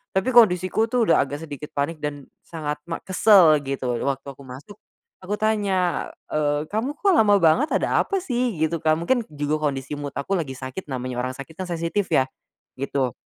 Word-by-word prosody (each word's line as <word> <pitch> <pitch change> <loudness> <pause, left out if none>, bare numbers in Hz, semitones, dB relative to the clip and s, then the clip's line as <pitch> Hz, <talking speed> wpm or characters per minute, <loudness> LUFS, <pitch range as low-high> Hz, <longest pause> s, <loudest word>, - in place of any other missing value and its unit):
Tapi 190 +7 +1
kondisiku 215 -1 +4
tuh 245 0 +1
udah - - +5
agak 145 +3 -6
sedikit 145 -1 -8
panik 150 +3 -1
dan 145 -2 -4 0.2
sangat 150 -3 -5
ma 165 - -4
kesel 185 -5 +6
gitu 130 -3 -2
tuh - - -3
waktu 135 0 -2
aku 140 +1 -14
masuk, 145 +11 -11 0.5
aku 205 +3 -2
tanya, 200 -5 0 0.2
eee, 145 -1 0
"Kamu 250 +8 -2
kok 400 -1 +3
lama 205 -7 +5
banget 175 - +4
ada - - +1
apa 390 -1 -1
sih?" 245 - -1
gitu 160 +1 0
Kak 155 0 +2
mungkin 235 +8 +1
juga 150 +1 -1
kondisi 135 0 -4
mood 145 -1 -6
aku 190 +8 -1
lagi 135 -5 -4
sakit 130 +8 -7
namanya 130 -2 -4
orang 130 +1 -2
sakit 140 +3 -9
kan 185 -1 -4
sensitif 170 +3 -1
ya, 130 - +3 0.5
gitu. 135 -2 -1
160 Hz, 190 wpm, -23 LUFS, 140-205 Hz, 0.5 s, kesel